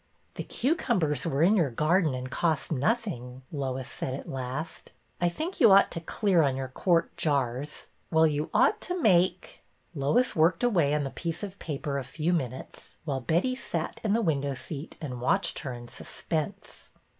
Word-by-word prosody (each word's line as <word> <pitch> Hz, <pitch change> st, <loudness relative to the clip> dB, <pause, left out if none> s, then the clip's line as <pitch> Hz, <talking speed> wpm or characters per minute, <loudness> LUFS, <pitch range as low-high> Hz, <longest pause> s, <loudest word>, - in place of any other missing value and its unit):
'' -, -, -40 dB
The -, -, -5 dB
cucumbers 230 Hz, -, 0 dB
were 150 Hz, -1 st, +1 dB
in 195 Hz, +5 st, +5 dB
your 165 Hz, -9 st, +3 dB
garden 155 Hz, +3 st, +2 dB
and 130 Hz, +1 st, -5 dB
cost 160 Hz, -1 st, 0 dB
nothing/' 135 Hz, -, -1 dB
Lois 130 Hz, -3 st, -3 dB
said 130 Hz, -, -4 dB
at -, -, -8 dB
last. 135 Hz, +4 st, -5 dB
'' -, -, -32 dB
I 175 Hz, -, +3 dB
think 320 Hz, -, -5 dB
you 220 Hz, -, +7 dB
ought 195 Hz, +1 st, +6 dB
to 165 Hz, -, -3 dB
clear 185 Hz, +1 st, +2 dB
on 140 Hz, -3 st, +2 dB
your 130 Hz, -1 st, -4 dB
quart 165 Hz, +5 st, +1 dB
jars 140 Hz, -1 st, -1 dB
— -, -, -40 dB
well, 160 Hz, -1 st, +5 dB
you 150 Hz, -1 st, 0 dB
ought -, -, +3 dB
to 360 Hz, 0 st, -3 dB
make 185 Hz, -, +2 dB
— -, -, -41 dB
" -, -, -41 dB
Lois 165 Hz, -, +1 dB
worked 165 Hz, +8 st, +3 dB
away 170 Hz, -12 st, +3 dB
on 150 Hz, -, 0 dB
the 135 Hz, -, -4 dB
piece 170 Hz, +2 st, -4 dB
of 200 Hz, -1 st, -6 dB
paper 140 Hz, -2 st, -3 dB
a -, -, -4 dB
few 155 Hz, +6 st, -1 dB
minutes, 130 Hz, -6 st, -5 dB
while 135 Hz, -4 st, -2 dB
Betty 175 Hz, -, +1 dB
sat 170 Hz, -10 st, -4 dB
in 210 Hz, -2 st, +1 dB
the 230 Hz, +1 st, +2 dB
window 140 Hz, -5 st, 0 dB
seat 140 Hz, +4 st, -7 dB
and 125 Hz, -6 st, -5 dB
watched 125 Hz, -, +1 dB
her 140 Hz, -, -5 dB
in 120 Hz, 0 st, -9 dB
suspense. 160 Hz, +8 st, -5 dB
155 Hz, 195 wpm, -28 LUFS, 135-185 Hz, -, you